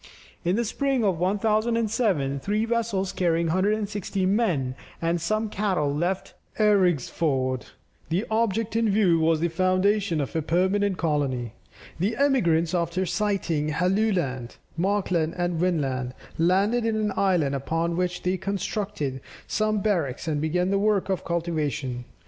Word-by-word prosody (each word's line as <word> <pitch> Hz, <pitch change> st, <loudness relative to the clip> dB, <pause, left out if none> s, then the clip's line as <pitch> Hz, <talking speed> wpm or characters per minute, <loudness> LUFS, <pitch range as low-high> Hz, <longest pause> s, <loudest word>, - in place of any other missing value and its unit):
In 175 Hz, +2 st, +1 dB
the 235 Hz, +2 st, 0 dB
spring 270 Hz, +2 st, 0 dB
of 190 Hz, -5 st, +1 dB
1007, 210 Hz, -, +1 dB
three 210 Hz, +8 st, 0 dB
vessels 225 Hz, -5 st, -1 dB
carrying 170 Hz, -2 st, +1 dB
160 200 Hz, +2 st, 0 dB
men 185 Hz, -, +1 dB, 0.3 s
and 170 Hz, 0 st, 0 dB
some 215 Hz, +6 st, 0 dB
cattle, 190 Hz, -9 st, 0 dB
left 175 Hz, +5 st, -2 dB, 0.2 s
Eriksfjord; 160 Hz, -, +1 dB, 0.4 s
the 180 Hz, +7 st, 0 dB
object 225 Hz, 0 st, 0 dB
in 225 Hz, -1 st, +2 dB
view 195 Hz, -5 st, +3 dB
was 160 Hz, 0 st, +2 dB
the 170 Hz, -, +2 dB
foundation 185 Hz, +1 st, +1 dB
of 140 Hz, +1 st, -3 dB
a 160 Hz, -, +1 dB
permanent 190 Hz, +4 st, +1 dB
colony. 135 Hz, -8 st, -1 dB, 0.5 s
The 205 Hz, +6 st, 0 dB
emigrants 170 Hz, -, +2 dB
after 175 Hz, +1 st, 0 dB
sighting 180 Hz, -7 st, 0 dB
Helluland, 180 Hz, -, 0 dB, 0.2 s
Markland, 180 Hz, -3 st, 0 dB
and 175 Hz, -2 st, -1 dB
Vinland, 135 Hz, -8 st, -1 dB, 0.2 s
landed 195 Hz, +8 st, +3 dB
in 225 Hz, -1 st, 0 dB
an 210 Hz, -2 st, 0 dB
island, 175 Hz, -8 st, +2 dB
upon 165 Hz, +5 st, -1 dB
which 180 Hz, 0 st, -2 dB
they 185 Hz, +1 st, +1 dB
constructed 195 Hz, -, -3 dB, 0.2 s
some 215 Hz, -1 st, 0 dB
barracks 170 Hz, -10 st, -1 dB
and 150 Hz, -2 st, 0 dB
began 180 Hz, +4 st, 0 dB
the 200 Hz, -, +2 dB
work 205 Hz, -2 st, +1 dB
of 190 Hz, -, -1 dB
cultivation. 150 Hz, -7 st, -2 dB
185 Hz, 135 wpm, -25 LUFS, 160-210 Hz, 0.5 s, view